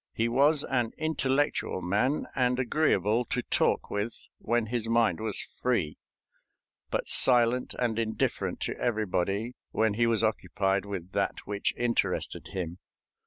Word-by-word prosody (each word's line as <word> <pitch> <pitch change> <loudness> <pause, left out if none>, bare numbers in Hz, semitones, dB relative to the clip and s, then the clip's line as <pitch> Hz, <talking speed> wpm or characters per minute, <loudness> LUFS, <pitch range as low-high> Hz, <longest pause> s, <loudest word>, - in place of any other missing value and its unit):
He 115 - +1
was 140 +5 +3
an 120 -4 -1
intellectual 145 -8 0
man, 105 +11 +1
and 125 -1 +1
agreeable 120 - +2
to 125 +2 -2
talk - - +1
with 105 +3 -3
when 120 0 0
his 115 0 -3
mind 115 -2 +2
was 110 -2 -3 0.2
free, 105 -12 0 0.9
but - - -2
silent 125 0 +4
and 115 -2 0
indifferent 110 -1 -1
to - - -2
everybody 105 0 -1 0.2
when 110 -1 +1
he 115 +2 +2
was 115 -1 +1
occupied 100 -2 0
with 95 -3 -6
that - - -2
which 100 -1 -1
interested 120 -1 -1
him. 90 -2 -5
115 Hz, 135 wpm, -28 LUFS, 105-125 Hz, 0.9 s, silent